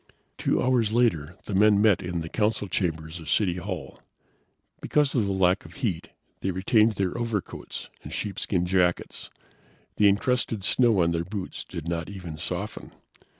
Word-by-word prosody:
Two -, -, +1 dB
hours 120 Hz, -4 st, +2 dB
later 90 Hz, -10 st, +1 dB
the 105 Hz, -, -4 dB
men 105 Hz, +1 st, +5 dB
met 105 Hz, -3 st, +4 dB
in 90 Hz, -1 st, -3 dB
the 80 Hz, -, -5 dB
Council 105 Hz, +2 st, 0 dB
chambers 80 Hz, -3 st, -2 dB
of 80 Hz, -, -8 dB
City 90 Hz, -4 st, +2 dB
Hall. 85 Hz, -, -6 dB, 0.8 s
Because 145 Hz, -2 st, +2 dB
of 115 Hz, -6 st, +2 dB
the -, -, 0 dB
lack 95 Hz, 0 st, +2 dB
of -, -, -13 dB
heat, 110 Hz, -, -2 dB, 0.3 s
they 95 Hz, -, -2 dB
retained 105 Hz, +4 st, +3 dB
their 95 Hz, -3 st, -1 dB
overcoats 115 Hz, -5 st, -4 dB
and -, -, -9 dB
sheepskin 95 Hz, -3 st, -1 dB
jackets. 90 Hz, -1 st, 0 dB, 0.7 s
The 105 Hz, -, +6 dB
incrusted 110 Hz, 0 st, 0 dB
snow 115 Hz, -5 st, +4 dB
on 85 Hz, -, +2 dB
their 85 Hz, 0 st, 0 dB
boots 95 Hz, +1 st, -5 dB
did 85 Hz, -1 st, -7 dB
not 85 Hz, 0 st, -2 dB
even 90 Hz, -6 st, -7 dB
soften. 90 Hz, +5 st, -5 dB
95 Hz, 160 wpm, -26 LUFS, 85-110 Hz, 0.8 s, The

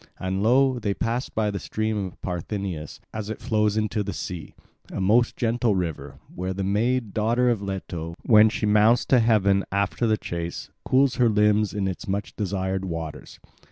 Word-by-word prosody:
And 95 Hz, +1 st, -2 dB
lo, 130 Hz, +3 st, +3 dB
they 100 Hz, -3 st, -1 dB
passed 120 Hz, +3 st, -2 dB
by 105 Hz, -1 st, +1 dB
the 100 Hz, -, -4 dB
stream 110 Hz, 0 st, -2 dB
of 90 Hz, -, -13 dB
Parthenius 90 Hz, -3 st, -4 dB
as 110 Hz, -1 st, -5 dB
it 110 Hz, -, -5 dB
flows 105 Hz, -3 st, +1 dB
into 110 Hz, 0 st, 0 dB
the 100 Hz, -1 st, -3 dB
sea, 90 Hz, -1 st, -6 dB, 0.4 s
a -, -, -4 dB
most 110 Hz, +6 st, +3 dB
gentle 115 Hz, -2 st, +1 dB
river, 75 Hz, -6 st, -4 dB, 0.2 s
where 95 Hz, +1 st, -3 dB
the 100 Hz, +1 st, -3 dB
maid, 110 Hz, +3 st, 0 dB
daughter 120 Hz, +3 st, +2 dB
of 110 Hz, -4 st, -1 dB
Leto, 90 Hz, -4 st, -5 dB
when 110 Hz, -1 st, +6 dB
she 110 Hz, -, -2 dB
mounts 105 Hz, +3 st, +4 dB
to 130 Hz, -, +4 dB
heaven 100 Hz, -4 st, +3 dB
after 100 Hz, +4 st, 0 dB
the 110 Hz, -1 st, +2 dB
chase, 85 Hz, -3 st, -5 dB
cools 135 Hz, 0 st, +2 dB
her 120 Hz, -2 st, +4 dB
limbs 105 Hz, 0 st, +3 dB
in 100 Hz, -2 st, -2 dB
its 95 Hz, -, -5 dB
much 100 Hz, +1 st, -3 dB
desired 95 Hz, -2 st, -2 dB
waters. 80 Hz, -4 st, -6 dB
105 Hz, 180 wpm, -25 LUFS, 95-110 Hz, 0.4 s, when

